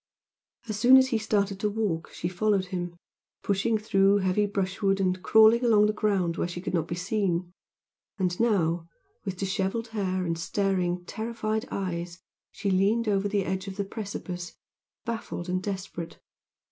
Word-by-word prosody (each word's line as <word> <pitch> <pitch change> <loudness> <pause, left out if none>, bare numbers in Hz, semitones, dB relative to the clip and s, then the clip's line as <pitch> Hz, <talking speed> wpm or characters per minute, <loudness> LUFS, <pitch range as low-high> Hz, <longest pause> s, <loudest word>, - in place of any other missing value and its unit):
As 215 -2 -3
soon 250 +4 +8
as 260 0 +4
he 230 -4 +1
started 200 -3 0
to 210 - +1
walk 200 -6 -2
she 175 - -4
followed 190 +2 +1
him, 175 -1 -3 0.5
pushing 205 +3 +1
through 200 -2 +3
heavy 200 +1 +1
brushwood 195 0 0
and 185 -1 0
crawling 220 +4 +6
along 215 -3 +5
the 210 - +2
ground 195 -6 0
where - - 0
she 175 0 -6
could 185 - -5
not 165 -2 0
be 170 - -3
seen; 180 -2 -1 0.7
and 180 -3 -1
now, 175 -7 +1 0.4
with 190 -1 -3
dishevelled 195 +4 -1
hair, 185 -4 -1
and 165 -1 -2
staring, 180 -1 0
terrified 220 +2 -3
eyes 175 -2 -3 0.3
she 200 - -2
leaned 205 +5 +2
over 200 -1 +2
the 200 -2 0
edge 190 +1 -3
of 195 - -5
the 200 - -1
precipice, 195 -4 -6 0.5
baffled 225 -6 -4
and 185 0 -1
desperate. 185 -4 -5
195 Hz, 160 wpm, -27 LUFS, 180-215 Hz, 0.7 s, soon